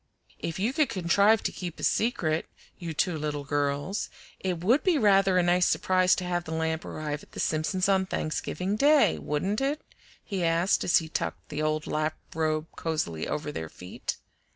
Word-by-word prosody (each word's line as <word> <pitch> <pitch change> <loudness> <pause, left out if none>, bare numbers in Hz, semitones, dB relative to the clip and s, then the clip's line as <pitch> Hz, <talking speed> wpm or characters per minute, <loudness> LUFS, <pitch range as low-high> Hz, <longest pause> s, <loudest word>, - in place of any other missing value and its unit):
"If 165 - -4
you 215 +7 0
could 305 -2 +2
contrive 200 +4 +3
to - - 0
keep 175 -3 -6
a - - -7
secret, 165 -9 +1 0.3
you 170 -2 -4
two 160 +1 0
little 150 -1 -3
girls, 145 +6 -1 0.3
it 180 -3 -3
would 245 +10 +4
be 365 -5 +3
rather 195 -5 +4
a 180 - +4
nice 175 +1 +3
surprise 185 0 +3
to 185 - -4
have 175 -1 -1
the 160 - -5
lamp 160 0 -1
arrive 150 -1 -4
at - - -18
the - - -7
Simpsons' 170 +5 0
on 190 -1 +2
Thanksgiving 180 +5 -2
Day, 285 - +4
wouldn't 190 - -1
it?" 285 +3 0 0.4
he 195 -4 -3
asked, 170 +3 +2
as 175 - +4
he 160 - -1
tucked 160 - -4
the 150 0 -3
old 155 0 0
lap 155 +1 -1 0.2
robe 155 -1 0
cosily 155 - -2
over 150 0 -3
their 80 - -5
feet. 90 +3 -6
170 Hz, 185 wpm, -28 LUFS, 155-195 Hz, 0.4 s, would